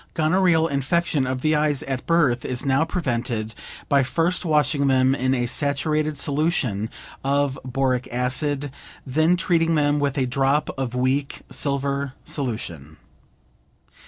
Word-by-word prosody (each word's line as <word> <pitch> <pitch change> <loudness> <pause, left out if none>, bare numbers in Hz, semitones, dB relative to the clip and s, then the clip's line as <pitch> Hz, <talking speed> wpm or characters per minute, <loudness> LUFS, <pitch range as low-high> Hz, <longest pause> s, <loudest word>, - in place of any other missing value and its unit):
Gonorrheal 165 0 +3
infection 140 0 0
of 130 0 -2
the 155 +1 +2
eyes 150 -2 +1
at 135 -2 -4
birth 150 -8 +2
is 125 +2 -4
now 135 +3 +3
prevented 120 -9 -2 0.3
by 140 -1 +4
first 165 +7 +1
washing 150 -3 +2
them 130 0 +3
in 130 -1 +1
a 120 -1 0
saturated 150 +3 0
solution 140 - 0 0.3
of 140 0 0
boric 130 -1 -1
acid, 135 +3 -1 0.3
then 160 +6 +2
treating 165 -2 +2
them 145 -1 +2
with 145 0 -1
a 130 - +2
drop 135 +3 +1
of 130 -2 -3
weak 130 +3 0
silver 140 -1 -1
solution. 85 - -4
140 Hz, 130 wpm, -23 LUFS, 130-155 Hz, 0.3 s, by